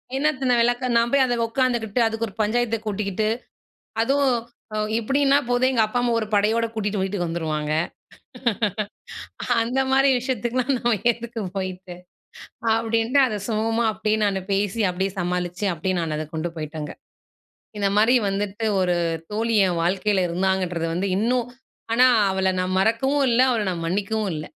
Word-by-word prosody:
என்னத்த 270 -1 0
நான் 240 -1 +4
விளக்க? 245 +2 +1
நான் 235 0 +3
போய் 280 -1 +4
அதை 245 -1 0
உட்காந்துக்கிட்டு, 235 -2 0
அதுக்கு 225 +1 -2
ஒரு 195 - -11
பஞ்சாயத்தை 230 +2 +1
கூட்டிக்கிட்டு 210 0 -1 0.7
அதுவும் 270 0 +2 0.4
அ - - -1 0.2
இப்படின்னா 275 +4 +3
போதும் 250 +1 +3
எங்க 235 - +2
அப்பா, 245 +3 -1
அம்மா 245 -1 +1
ஒரு 215 - -3
படையோட 220 +3 +2
கூட்டிகிட்டு 210 -2 -2
வீட்டுக்கு 190 -2 -2
வந்துருவாங்க. 155 -2 -2 1.9
அந்த 250 +4 -1
மாதிரி 270 +1 +4
விஷயத்துக்குலாம் 250 +1 -1
நம்ம 240 0 +1 0.2
எதுக்கு 235 +1 -7 0.2
போய்ட்டு? 185 -1 -5 0.8
அப்டீன்ட்டு. 230 +4 +1
அதை 215 -5 -2
சுமூகமா 225 +1 0
அப்டீயே 215 +1 0
நானு 195 -1 0
பேசி, 200 +2 0
அப்படியே 190 +2 -1
சமாளிச்சு, 180 +2 -2
அப்டீயே 180 +3 -2
நான் 160 -2 -2
அதை 155 - -3
கொண்டு 160 +2 -2
போயிட்டேங்க. 155 -1 -5 0.9
இந்த 200 -1 +2
மாதிரி 225 +4 +5
வந்துட்டு 205 +2 -2
ஒரு 180 -1 +1 0.4
தோழி 225 +1 0
என் 175 -2 -1
வாழ்க்கையில 190 +2 +1
இருந்தாங்கன்றது 180 -1 0
வந்து 190 +3 -1
இன்னும் 240 +3 +1 0.5
ஆனா 250 +2 +6 0.2
அவளை 190 0 +1
நான் 185 0 -1
மறக்கவும் 265 +7 +2
இல்ல, 235 +1 +3
அவள 230 -4 +1
நான் 170 -2 -4
மன்னிக்கவும் 205 +3 -1
இல்ல. 155 0 -5
215 Hz, 150 wpm, -23 LUFS, 185-240 Hz, 1.9 s, ஆனா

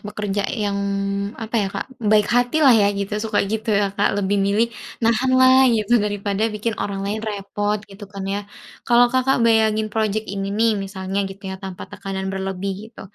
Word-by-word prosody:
bekerja 205 -1 -3
yang 205 -4 -2 0.6
apa 225 -1 -8
ya, 200 - 0
Kak, - - -5
baik 210 -1 +4
hati 245 +4 +2
lah 265 - +8
ya 210 -3 +5
gitu 200 +1 -4
suka 215 -1 -1
gitu 220 +3 -4
ya, 200 -2 +2
Kak, 200 0 +1
lebih 200 0 +1
milih 210 +4 +1 0.3
nahan 235 +3 +2
lah 260 0 +6
gitu 230 0 +2
daripada 205 +1 -1
bikin 215 +1 -3
orang 195 -1 -3
lain 210 +2 -2
repot 205 -1 -2
gitu 200 +1 -11
kan 195 -1 -7
ya. 195 +1 -2 0.5
Kalau 240 0 +6
Kakak 260 +1 +2
bayangin 220 -1 +2
project 220 0 0
ini 195 0 -3
nih 230 +1 +3
misalnya 190 0 -4
gitu 195 +1 -12
ya - - -4
tanpa 190 -2 -7
tekanan 195 -1 -5
berlebih 190 0 -3 0.2
gitu, 230 - -14
210 Hz, 185 wpm, -21 LUFS, 200-225 Hz, 0.6 s, lah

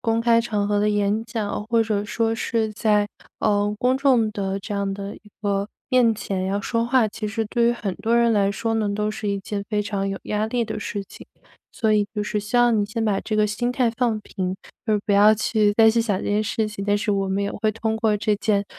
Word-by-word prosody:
公 225 0 +1
开 230 0 +4
场 210 -3 -1
合 205 0 +1
的 210 +1 +2
演 205 +1 +1
讲， 210 -2 -3
或 230 0 +2
者 210 -2 -1
说 225 0 0
是 225 -1 -1
在， 210 -1 +2 0.3
呃， 205 -1 +1
公 255 +1 +2
众 250 -6 +3
的 195 -1 -3
这 205 - -6
样 200 -1 -1
的 200 0 -6
一 - - -18 0.2
个 200 0 0 0.2
面 245 -4 +4
前 190 -3 -3
要 200 +1 -1
说 230 +2 -1
话， 245 -3 +3
其 215 +1 -5
实 220 +1 -2
对 235 +1 +1
于 235 - +4
很 210 -5 -3
多 230 +1 +1
人 235 -1 +4
来 200 -2 +3
说 225 +3 -2
呢， 215 -2 0
都 210 +1 -1
是 215 -1 -4
一 200 -1 -1
件 200 +1 -4
非 210 -1 0
常 200 -1 -2
有 195 - -3
压 210 +1 -1
力 235 +1 0
的 220 -1 -5
事 205 -1 -4
情。 195 - -14 0.5
所 220 -1 +1
以 205 -1 +3
就 210 - -1
是 210 0 -2
希 210 +4 -2
望 240 -3 +4
你 205 - +1
先 225 +2 -3
把 205 -2 +1
这 215 - -4
个 215 - +3
心 240 +4 -1
态 250 -2 +2
放 230 -4 0
平， 185 -2 -4 0.3
而 215 -1 +3
不 - - -3
要 210 +2 +6
去 215 -1 +2
再 220 -1 +7
去 230 - +2
想 220 -4 0
这 - - -6
件 210 +1 +2
事 215 0 -1
情。 200 -2 -6
但 205 0 +2
是 210 +1 -1
我 195 -1 0
们 195 +1 0
也 200 - -1
会 215 -1 -1
通 220 0 -2
过 220 -1 +1
这 210 0 0
件 205 -1 +1
215 Hz, 270 characters per minute, -23 LUFS, 205-225 Hz, 0.5 s, 再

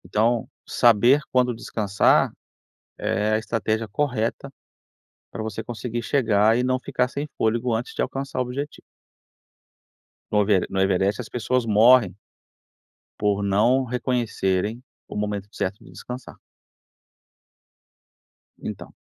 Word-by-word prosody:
Então, 110 +5 +1 0.2
saber 120 +5 +4
quando 125 -2 +2
descansar, 105 -3 +2 0.7
é 105 +2 0
a 110 - +3
estratégia 110 0 -1
correta 125 +2 -2 0.8
para 110 - -5
você 110 0 -4
conseguir 120 0 -5
chegar 110 -4 +3
e - - +1
não 130 0 +1
ficar 125 0 -1
sem 145 +3 -4
fôlego 115 +2 +1
antes 115 +2 -3
de - - 0
alcançar 135 -1 -4
o - - +3
objetivo. 140 +4 -5 1.5
No 105 - +4
Evere 100 -3 +2
no 95 - -2
Everest 95 +2 +1
as 115 - -10
pessoas 125 +1 0
morrem 110 -2 +5 1.0
por 100 -1 +1
não 110 +7 +3
reconhecerem 115 -3 -1 0.2
o - - -9
momento 105 -1 -3
certo 100 +2 -3
de - - -15
descansar. 125 0 -8 2.2
Então. - - -7
115 Hz, 120 wpm, -24 LUFS, 105-125 Hz, 2.2 s, morrem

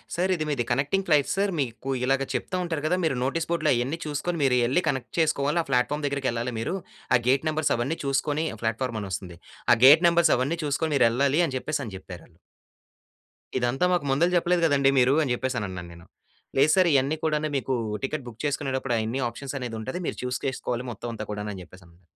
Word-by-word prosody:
"Sir 185 +2 +1
ఇది 155 -3 -3
మీది 140 -5 0
connecting 190 +8 0
flight 150 -4 +3
sir, 200 0 +1
మీకు 130 0 -3
ఇలాగ 135 +1 +1
చెప్తూ 185 - -2
ఉంటారు 160 -4 -3
కదా! 180 - +1
మీరు 140 -5 0
నోటీస్ 160 +6 -1
బోర్డ్‌లో 170 - +2
అయన్నీ 130 +7 -1
చూసుకొని 155 +3 -2
మీరు 125 -2 +3
ఎళ్లి 160 +9 +1
కనెక్ట్ 130 -3 -3
చేసుకోవాలి. 150 0 +1
ఆ - - -20
ప్లాట్‌ఫామ్ 135 +4 +1
దగ్గరికి 140 -1 -1
ఎళ్ళాలి 120 +1 -3
మీరు. 115 +11 -2 0.4
ఆ - - +4
గేట్ 135 +4 +2
నెంబర్స్ 155 -1 +1
అవన్నీ 135 +8 -2
చూసుకొని", 145 +3 0 0.2
ప్లాట్ఫామ్ 115 0 -1
అని 100 - -6
వస్తుంది. 90 -2 -5 0.4
"ఆ! - - +6
గేట్ 155 +6 +8
నంబర్స్ 170 -1 +4
అవన్నీ 140 +7 -1
చూసుకొని 150 +2 -1
మీరు 125 -3 +5
ఎళ్ళాలి" 140 +6 +2
అని 135 - -5
చెప్పేసని 130 -7 -4
చెప్పారాళ్ళు. 90 -2 -12 1.2
ఇదంతా 125 +6 +1
మాకు 175 - 0
ముందల 160 +6 +3
చెప్పలేదు 175 0 +2
కదండీ 140 -3 +3
మీరు, 125 +2 +4
అని 130 -4 0
చెప్పేసనన్నాను 100 -9 -4
నేను. 85 0 -14 0.5
"లేదు 145 +3 +5
సర్ 185 -2 +4
ఇయన్నీ 140 +3 +2
కూడాను 155 -1 0
మీకు 135 0 -2 0.3
టికెట్ 135 0 -3
బుక్ 115 -2 -9
చేసుకునేటప్పుడు 135 -3 -1
అయన్ని 115 +4 -2
ఆప్షన్ 135 +4 -7
అనేది 120 -3 -5
ఉంటది. 130 +10 -4
మీరు - - -3
చూజ్ 125 0 -2
చేసుకోవాలి 125 -1 -3
మొత్తం 120 +2 -6
అంతా 110 - -5
కూడా" 105 0 -4
అని 95 - -8
చెప్పేసనన్నారు... 90 -1 -19
135 Hz, 195 wpm, -26 LUFS, 120-155 Hz, 1.2 s, గేట్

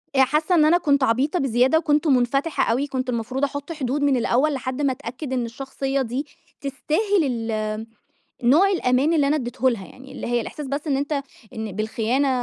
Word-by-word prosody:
آآ 265 - +5
حاسة 305 +6 +2
إن 310 -3 +5
أنا 330 +3 +5
كنت 285 -5 +2
عبيطة 260 +8 +1
بزيادة 260 +2 +3
وكنت 300 -1 +1
منفتحة 275 +3 +2
أوي 265 +5 0
كنت 260 -2 -3
المفروض 250 +3 -2
أحط 285 +2 -2
حدود 285 -2 -2
من 285 -2 +3
الأول، 255 +5 +2
لحد 260 +1 -3
ما 280 -2 +2
أتأكد 260 +1 -6
إن 250 -2 0
الشخصية 270 +2 -3
دي 255 +4 -3 0.4
تستاهل 320 +8 0 0.3
ال 215 0 -3 0.6
نوع 305 +11 +5
الأمان 275 -4 +2
اللي 295 -3 +3
أنا 290 +2 +2
اديته 255 -1 0
لها 195 -6 -4
يعني 265 +1 -14
اللي - - -6
هي 240 0 +1
الإحساس 290 +5 -6
بس 280 +3 -4
إن 280 -3 +1
أنت 285 +1 -1 0.3
إن 220 -2 -5
بالخيانة 225 +6 0
270 Hz, 190 wpm, -23 LUFS, 245-295 Hz, 0.6 s, آآ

